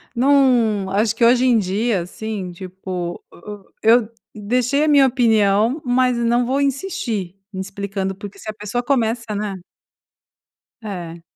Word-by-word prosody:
não 240 Hz, -6 st, +3 dB
acho 215 Hz, +2 st, +1 dB
que 235 Hz, -, 0 dB
hoje 245 Hz, +2 st, +4 dB
em 245 Hz, -2 st, +4 dB
dia, 205 Hz, +1 st, 0 dB
assim, 190 Hz, +1 st, -6 dB
tipo, 180 Hz, -1 st, -6 dB
e 205 Hz, +3 st, -10 dB
e -, -, +8 dB
eu 235 Hz, -2 st, +4 dB, 0.3 s
deixei 245 Hz, +7 st, 0 dB
a -, -, 0 dB
minha 285 Hz, -3 st, +6 dB
opinião, 225 Hz, +1 st, +2 dB
mas 250 Hz, 0 st, +2 dB
não 235 Hz, +1 st, +1 dB
vou 270 Hz, +3 st, 0 dB
insistir 270 Hz, -, -2 dB, 0.2 s
explicando, 195 Hz, 0 st, -4 dB
porque 200 Hz, +1 st, -10 dB
se 220 Hz, -, -8 dB
a -, -, -3 dB
pessoa 210 Hz, +3 st, -4 dB
começa, 230 Hz, -4 st, 0 dB
né? 205 Hz, -1 st, -3 dB, 1.3 s
É. 175 Hz, -6 st, -7 dB
220 Hz, 145 wpm, -20 LUFS, 195-245 Hz, 1.3 s, e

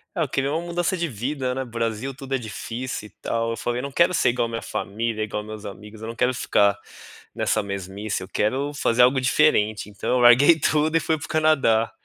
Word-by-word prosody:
Ah, -, -, -1 dB
eu -, -, -2 dB
queria 135 Hz, +1 st, -1 dB
uma 160 Hz, -, -1 dB
mudança 175 Hz, +2 st, -1 dB
de 170 Hz, -1 st, -1 dB
vida, 130 Hz, +2 st, -3 dB
né. 130 Hz, -, -3 dB
Brasil 115 Hz, +1 st, -3 dB
tudo 135 Hz, 0 st, -7 dB
é -, -, +3 dB
difícil 115 Hz, +1 st, -6 dB
e -, -, -18 dB
tal, 115 Hz, 0 st, -1 dB
eu 115 Hz, -, -4 dB
falei: 120 Hz, +2 st, -2 dB
"Eu 125 Hz, -, -5 dB
não 140 Hz, -, -5 dB
quero 170 Hz, +6 st, +3 dB
ser 170 Hz, -, +3 dB
igual 120 Hz, 0 st, 0 dB
a -, -, -9 dB
minha 115 Hz, 0 st, -4 dB
família, 110 Hz, +1 st, -3 dB
igual 105 Hz, 0 st, -4 dB
meus 110 Hz, 0 st, -9 dB
amigos, 105 Hz, +2 st, -10 dB
eu 110 Hz, -, -6 dB
não 115 Hz, -, -6 dB
quero 125 Hz, +2 st, +1 dB
ficar 100 Hz, -4 st, +2 dB, 0.6 s
nessa 110 Hz, -, +1 dB
mesmice, 100 Hz, 0 st, -4 dB
eu -, -, -9 dB
quero 135 Hz, +7 st, -1 dB
fazer 125 Hz, -4 st, +2 dB
algo 130 Hz, +2 st, +4 dB
diferente." 110 Hz, -7 st, +2 dB
Então, 100 Hz, -2 st, -5 dB
eu 125 Hz, -, +3 dB
larguei 125 Hz, +7 st, +7 dB
tudo 155 Hz, +1 st, +1 dB
e -, -, +5 dB
fui 160 Hz, 0 st, 0 dB
para 155 Hz, -, -7 dB
o -, -, -13 dB
Canadá. 140 Hz, -8 st, +2 dB
120 Hz, 235 wpm, -23 LUFS, 110-140 Hz, 0.6 s, larguei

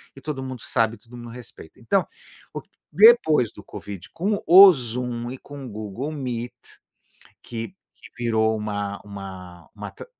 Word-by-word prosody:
e 135 Hz, -, -13 dB
todo 145 Hz, -4 st, -4 dB
mundo 130 Hz, -3 st, -7 dB
sabe, 115 Hz, -2 st, 0 dB
todo 120 Hz, +3 st, -14 dB
mundo 120 Hz, 0 st, -9 dB
respeita. 125 Hz, -1 st, -11 dB
Então, -, -, +1 dB, 0.5 s
o -, -, -5 dB
que -, -, -33 dB, 0.2 s
depois 165 Hz, -, +6 dB
do 105 Hz, -, -12 dB
Covid 100 Hz, -2 st, -9 dB
com 200 Hz, +4 st, -1 dB
o 190 Hz, +2 st, +10 dB
Zoom 120 Hz, -1 st, -4 dB
e 130 Hz, -, -7 dB
com 145 Hz, -1 st, -10 dB
o -, -, -7 dB
Google 110 Hz, +7 st, -5 dB
Meet, 125 Hz, -5 st, -4 dB, 0.9 s
que 120 Hz, +11 st, -6 dB, 0.4 s
virou 110 Hz, -2 st, +1 dB
uma 100 Hz, -1 st, -4 dB
uma 95 Hz, -4 st, -10 dB
uma -, -, -7 dB
tr -, -, -11 dB
120 Hz, 160 wpm, -23 LUFS, 105-135 Hz, 0.9 s, o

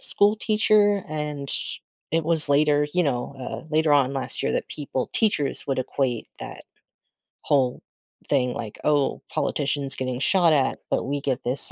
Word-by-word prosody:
school 205 Hz, +1 st, +3 dB
teacher, 210 Hz, -2 st, +2 dB
and 150 Hz, -2 st, -4 dB, 0.6 s
it 165 Hz, -1 st, +1 dB
was 160 Hz, -2 st, +4 dB
later, 145 Hz, +1 st, +3 dB
you 180 Hz, -, +3 dB
know 140 Hz, -3 st, -2 dB
uh, 130 Hz, -, -6 dB
later 155 Hz, -1 st, +2 dB
on 140 Hz, -2 st, +3 dB
last 135 Hz, -2 st, 0 dB
year -, -, 0 dB
that -, -, -2 dB
people 140 Hz, -3 st, -4 dB
teachers 200 Hz, -11 st, +1 dB
would 135 Hz, -2 st, -1 dB
equate 130 Hz, -2 st, -2 dB
that -, -, -8 dB, 0.8 s
whole 130 Hz, -4 st, 0 dB, 0.5 s
thing 125 Hz, -3 st, +1 dB
like, 110 Hz, -2 st, -7 dB
"Oh, 145 Hz, -2 st, +1 dB
politicians 140 Hz, -2 st, 0 dB
getting 130 Hz, -1 st, -3 dB
shot 170 Hz, +2 st, +3 dB
at, 140 Hz, -3 st, +1 dB
but -, -, 0 dB
we 140 Hz, +1 st, -3 dB
get 135 Hz, -2 st, -2 dB
this 125 Hz, +3 st, +2 dB
145 Hz, 160 wpm, -24 LUFS, 135-160 Hz, 0.8 s, was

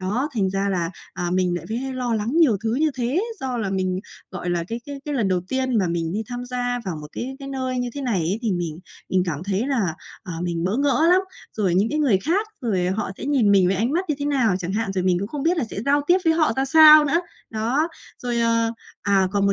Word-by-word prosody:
Đó, 220 Hz, +10 st, -1 dB
thành 195 Hz, -4 st, +1 dB
ra 195 Hz, +1 st, -1 dB
là, 175 Hz, -3 st, -1 dB, 0.2 s
à, 175 Hz, -2 st, -3 dB
mình 180 Hz, -1 st, +1 dB
lại 170 Hz, -, -7 dB
vế 225 Hz, -, -2 dB, 0.2 s
lo 250 Hz, -2 st, -1 dB
lắng 215 Hz, +2 st, -1 dB
nhiều 290 Hz, -11 st, +5 dB
thứ 225 Hz, +1 st, +1 dB
như 310 Hz, +3 st, +2 dB
thế, 260 Hz, +8 st, 0 dB, 0.2 s
do 255 Hz, -2 st, -2 dB
là 200 Hz, -4 st, -2 dB
mình 185 Hz, -1 st, -1 dB, 0.3 s
gọi 180 Hz, -1 st, -4 dB
là 170 Hz, -1 st, 0 dB
cái 230 Hz, +1 st, -4 dB
cái 280 Hz, -1 st, -7 dB
cái 295 Hz, -1 st, -3 dB
lần 220 Hz, -7 st, +1 dB
đầu 180 Hz, -1 st, +1 dB
tiên 260 Hz, -3 st, 0 dB
mà 190 Hz, -, +2 dB
mình 170 Hz, 0 st, -2 dB
đi 215 Hz, -, -1 dB
tham 245 Hz, 0 st, -5 dB
gia 245 Hz, 0 st, -2 dB
vào 175 Hz, -4 st, -3 dB
một 150 Hz, -, -8 dB
cái 265 Hz, +2 st, -5 dB
cái 275 Hz, -1 st, -8 dB
nơi 260 Hz, -2 st, -2 dB
như 245 Hz, -, -1 dB
thế 285 Hz, -, -4 dB
này 240 Hz, -8 st, 0 dB
ấy, 180 Hz, +6 st, -1 dB
thì 220 Hz, -4 st, +1 dB
mình 170 Hz, -3 st, -3 dB, 0.3 s
mình 185 Hz, -1 st, +2 dB
cảm 155 Hz, -1 st, -3 dB
thấy 200 Hz, +4 st, -1 dB
là, 225 Hz, -, 0 dB, 0.3 s
ờ, 180 Hz, -, -7 dB
mình 170 Hz, -1 st, -2 dB
bỡ 195 Hz, +6 st, 0 dB
ngỡ 285 Hz, +3 st, +3 dB
lắm, 370 Hz, +1 st, +6 dB, 0.4 s
rồi 190 Hz, -5 st, +1 dB
những 200 Hz, +4 st, +3 dB
cái 305 Hz, -, -1 dB
người 250 Hz, -11 st, +3 dB
khác, 365 Hz, -, 0 dB
rồi 190 Hz, -7 st, 0 dB
họ 190 Hz, +2 st, -1 dB
sẽ -, -, -6 dB
nhìn 260 Hz, -8 st, +3 dB
mình 190 Hz, -2 st, +5 dB
với 190 Hz, +1 st, +1 dB
ánh 235 Hz, +7 st, 0 dB
mắt 360 Hz, +3 st, +1 dB
như 300 Hz, -, +1 dB
thế 285 Hz, -, -3 dB
nào 255 Hz, -9 st, +2 dB
chẳng 180 Hz, 0 st, -4 dB
hạn, 210 Hz, -1 st, -1 dB
rồi 185 Hz, -1 st, 0 dB
mình 180 Hz, -1 st, +3 dB
cũng 200 Hz, -, -3 dB
không 285 Hz, +2 st, -4 dB
biết 345 Hz, +2 st, +2 dB
là 265 Hz, -, +1 dB
sẽ 200 Hz, -, -4 dB
giao 285 Hz, +1 st, +4 dB
tiếp 360 Hz, +2 st, +5 dB
với 325 Hz, -, +5 dB
họ 310 Hz, -7 st, +2 dB
ra 265 Hz, -, +1 dB
sao 310 Hz, +1 st, +8 dB
nữa. 330 Hz, +4 st, +2 dB, 0.3 s
Đó, 240 Hz, +9 st, 0 dB, 0.3 s
rồi, 240 Hz, -1 st, -1 dB
ờ, 230 Hz, 0 st, +2 dB, 0.3 s
à, 195 Hz, -2 st, +3 dB
còn 200 Hz, -1 st, +2 dB
một 200 Hz, -, +3 dB
225 Hz, 270 wpm, -23 LUFS, 190-270 Hz, 0.4 s, sao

